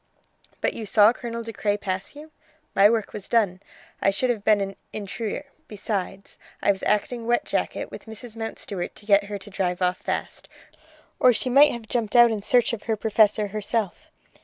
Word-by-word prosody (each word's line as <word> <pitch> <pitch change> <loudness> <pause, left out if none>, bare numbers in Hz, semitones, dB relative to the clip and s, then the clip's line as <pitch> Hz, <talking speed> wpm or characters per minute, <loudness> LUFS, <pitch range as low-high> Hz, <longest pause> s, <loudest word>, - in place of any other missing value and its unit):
"But - - +1
you 220 - -6
saw 210 +2 +6
Colonel 235 -2 -6
De 225 0 -7
Craye 205 -1 0
pass 190 +4 -4
you?" 305 +2 -12 0.4
"My 200 +1 +6
work 225 -2 -1
was 205 -2 -7
done; 200 -6 +2 0.4
I - - +4
should 245 +6 +1
have 215 -4 -4
been 215 -1 +4
an 195 0 -3 0.2
intruder. 215 +6 -5 0.2
Besides 200 -2 -5 0.2
I - - +3
was 195 - -4
acting 230 +3 0
wet 240 0 +2
jacket - - -2
with - - -10
Mrs. 220 +1 -8
Mountstuart 210 -5 -5
to 205 - -12
get 200 -1 +4
her 205 0 -5
to 200 +1 -11
drive 180 -2 -1
off 180 0 +1
fast, - - -5 0.7
or 255 - +6
she 250 +3 -1
might 285 +3 +7
have 235 -2 -7
jumped 230 -1 -2
out 240 -1 +8
in 215 -2 -2
search 245 +3 +2
of 225 - -4
her 220 - +3
Professor 210 -1 +2
herself." 210 -1 -3
215 Hz, 190 wpm, -24 LUFS, 200-230 Hz, 0.7 s, out